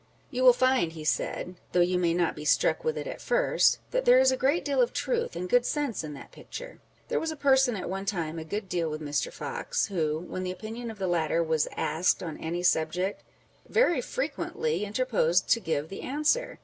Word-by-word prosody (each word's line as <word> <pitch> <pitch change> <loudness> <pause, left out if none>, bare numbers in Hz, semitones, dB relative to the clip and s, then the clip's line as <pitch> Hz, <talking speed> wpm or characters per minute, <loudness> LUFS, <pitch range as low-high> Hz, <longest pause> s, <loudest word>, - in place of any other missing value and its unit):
" - - -35
You 255 -2 -2
will 255 - +10
find," 255 -9 +2
he 160 -2 -8
said, 155 - -1
'â€¢ 180 - -12 0.2
though 180 - +3
you 180 +1 +2
may 170 -1 +2
not 175 -1 +1
be 150 - -7
struck 325 - +2
with 470 0 -1
it - - -4
at - - -6
first, - - +3
that - - 0
there 250 - +6
is 260 0 +5
a - - +1
great 275 +6 +1
deal 280 -3 +2
of 240 - +1
truth 475 0 -1
and 180 - -3
good 245 +6 +4
sense 280 - -2
in 150 -2 -6
that - - -12
picture." - - -9 0.3
There - - +1
was 325 - -2
a 315 - -4
person 265 -4 +3
at 185 - -5
one 195 +2 -4
time 165 -5 -2
a - - -5
good 200 +6 -4
deal 175 -3 -1
with 155 0 -4
Mr. 145 -1 -2
Fox, 485 - -2
who, 160 -6 -1
when 180 +2 -6
the 185 - -3
opinion 225 +5 -6
of 220 - -8
the 195 - -2
latter 170 -1 +1
was 160 -2 +1
asked 175 +3 +1
on 160 -3 -6
any 170 +2 -3
subject, 180 +3 +1 0.5
very 350 - +3
frequently 465 - -2
interposed 210 -6 +1
to 230 - +4
give 160 -6 -2
the 195 - -7
answer. 305 - 0
200 Hz, 225 wpm, -28 LUFS, 165-265 Hz, 0.5 s, will